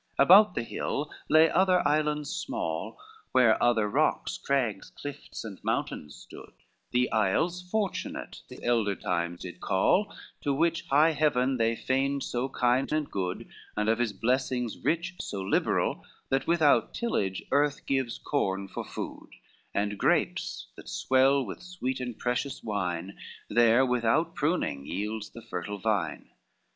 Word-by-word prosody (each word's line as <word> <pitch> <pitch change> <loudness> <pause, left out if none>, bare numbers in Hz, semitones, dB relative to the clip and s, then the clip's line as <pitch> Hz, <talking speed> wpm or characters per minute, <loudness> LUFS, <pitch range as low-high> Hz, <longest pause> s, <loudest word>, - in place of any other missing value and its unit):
XXXV - - +6
About 195 +3 +7
the 115 - -1
hill 145 +5 -3 0.2
lay 155 +1 +7
other 185 -3 +3
islands 150 -1 0
small, - - -3 0.4
Where 125 -4 +5
other 115 -3 +3
rocks, 105 - +1
crags, 125 -8 -1
cliffs, 145 0 -8
and 100 -4 -9
mountains 75 -2 -2
stood, - - -13 0.4
The 125 0 +1
Isles 160 - +1
Fortunate 195 +1 -3
these - - -11
elder 115 -4 +1
time 85 -1 -2
did 90 0 -9
call, 180 - +2 0.3
To 140 -1 0
which 170 +3 0
high 150 +4 +5
Heaven 135 -4 +1
they 115 0 +1
reigned 135 +1 +1
so 125 +2 -2
kind 125 0 +1
and 155 -1 -1
good, 90 -2 -3 0.3
And 105 0 0
of 115 +1 +2
his 120 -3 +1
blessings 125 +2 -1
rich 170 +3 -1
so 100 - -4
liberal, 95 - 0 0.3
That 135 0 0
without 165 -4 +3
tillage 100 - -1
earth 145 0 +1
gives 135 -3 -1
corn 100 -9 -1
for - - -5
food, - - -7 0.4
And 100 0 -1
grapes - - 0
that - - -10
swell 135 +1 +3
with - - -7
sweet 175 -9 -4
and 125 -3 -5
precious 130 +2 -2
wine 95 -3 -3 0.3
There 120 +3 +5
without 125 +7 +1
pruning 140 - -1
yields 105 +3 -3
the 115 - -12
fertile 105 -1 -5
vine. 105 -1 -2
125 Hz, 145 wpm, -28 LUFS, 105-150 Hz, 0.4 s, About